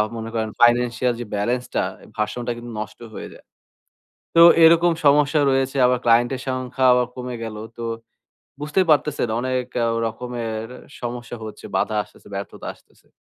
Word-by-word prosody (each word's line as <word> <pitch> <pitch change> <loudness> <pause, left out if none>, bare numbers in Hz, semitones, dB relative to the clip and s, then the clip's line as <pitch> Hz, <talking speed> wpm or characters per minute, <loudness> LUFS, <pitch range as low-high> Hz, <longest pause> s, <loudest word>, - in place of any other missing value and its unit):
মনে 115 0 -5
করেন 110 -1 -1
ফাইন্যান্সিয়াল 120 0 +3
যে - - -5
বেলেন্স 120 +5 0
টা, - - +2 0.3
ভার্সন 105 +3 -2
টা - - +1
কিন্তু 120 0 -8
নষ্ট 110 0 -7
হয়ে - - -7
যায়। - - -17 0.9
তো 165 - +7 0.2
এরকম 170 +1 +6
সমস্যা 145 +1 +4
রয়েছে 135 +1 0
আবার 125 0 +2
ক্লায়েন্ট 120 +2 +4
এর 130 - -7
সংখ্যা 130 0 -1
আবার 125 -1 +2
কমে 125 -1 -5
গেলো। 110 -1 -6 0.2
তো 120 - -6 0.8
বুঝতেই 150 +6 +1
পারতেছেন 145 -4 +1
অনেক 130 0 -1 0.4
রকমের 115 -1 -4 0.4
সমস্যা 120 0 -5
হচ্ছে, 110 - -9
বাধা 110 - 0
আসতেছে, - - -20
ব্যর্থতা 100 0 -7
আসতেছে। - - -28
125 Hz, 155 wpm, -22 LUFS, 115-130 Hz, 0.9 s, তো